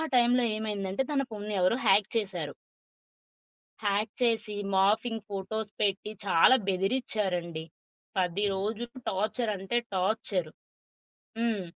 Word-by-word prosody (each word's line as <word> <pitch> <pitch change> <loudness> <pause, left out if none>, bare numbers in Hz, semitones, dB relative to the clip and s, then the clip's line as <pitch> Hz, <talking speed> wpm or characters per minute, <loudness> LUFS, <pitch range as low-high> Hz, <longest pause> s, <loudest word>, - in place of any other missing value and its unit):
టైంలో 245 +1 +5
ఏమైందంటే 205 +1 -2
తన 275 - +2
ఫోన్ని 210 -1 -5
ఎవరో 185 +6 +3
హ్యాక్ 200 +1 +5
చేశారు. 180 -9 -2 1.3
హ్యాక్ 205 +1 +1
చేసి 225 -3 +1 0.2
మార్ఫింగ్ 220 +3 +2
ఫోటోస్ 205 +2 -3
పెట్టి 205 0 0
చాలా 195 +7 +6
బెదిరిచ్చారండి. 190 -5 0 0.5
10 185 +2 +1
రోజులు 215 +5 -2 0.2
టార్చర్ 215 +4 0
అంటే 195 +5 -1 0.2
టార్చరు. 185 -3 0 0.9
హ్మ్. 230 -4 0
205 Hz, 100 wpm, -29 LUFS, 190-220 Hz, 1.3 s, చాలా